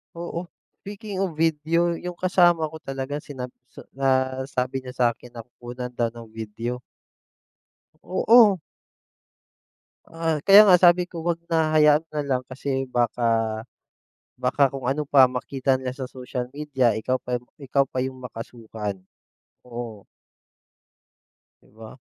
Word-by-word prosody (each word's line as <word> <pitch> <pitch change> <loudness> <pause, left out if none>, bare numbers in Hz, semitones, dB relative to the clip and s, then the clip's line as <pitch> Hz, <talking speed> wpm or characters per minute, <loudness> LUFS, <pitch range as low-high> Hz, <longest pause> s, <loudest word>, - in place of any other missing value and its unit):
Oo, 170 +1 -5 0.4
speaking 205 0 -7
of 175 - -6
video, 165 +2 +1
yung 180 0 -6
kasama 175 -3 +3
ko 160 - -9
talaga 135 -2 -5
sinab 135 -4 -7 0.2
sa, - - -13
nasabi 130 -1 -1
niya 130 -1 -7
sakin 120 0 -1
na 115 - -7
kukunan 120 +1 -8
daw 120 -2 -2
ng 115 -1 -11
video. 110 +2 -5 1.2
Oo. 210 +1 +5 1.5
Ah, 165 -2 -2
kaya 205 +2 +9
nga 185 - +8
sabi 175 0 +5
ko 165 -3 -8
'wag 170 -1 0
na, 160 -2 +1
hayaan 150 0 +5
na 150 - -3
lang, 130 -2 0
kasi 135 0 -2
baka, 120 -1 0 1.2
baka 140 -2 +2
kung 135 -2 -5
ano 145 +3 0
pa 135 -2 +6
makita 130 +1 -1
nila 130 -1 -3
sa 130 0 -6
social 125 -1 -5
media, 135 -6 +1
ikaw 130 +4 -1
pa 125 0 -3 0.2
ikaw 140 0 +1
pa 130 -1 -5
'yong 130 0 -2
makasuhan 110 -4 -7 0.6
oo. 115 -4 -8 1.6
'Di - - -24
ba? 110 +1 -10
135 Hz, 135 wpm, -24 LUFS, 125-160 Hz, 1.6 s, kaya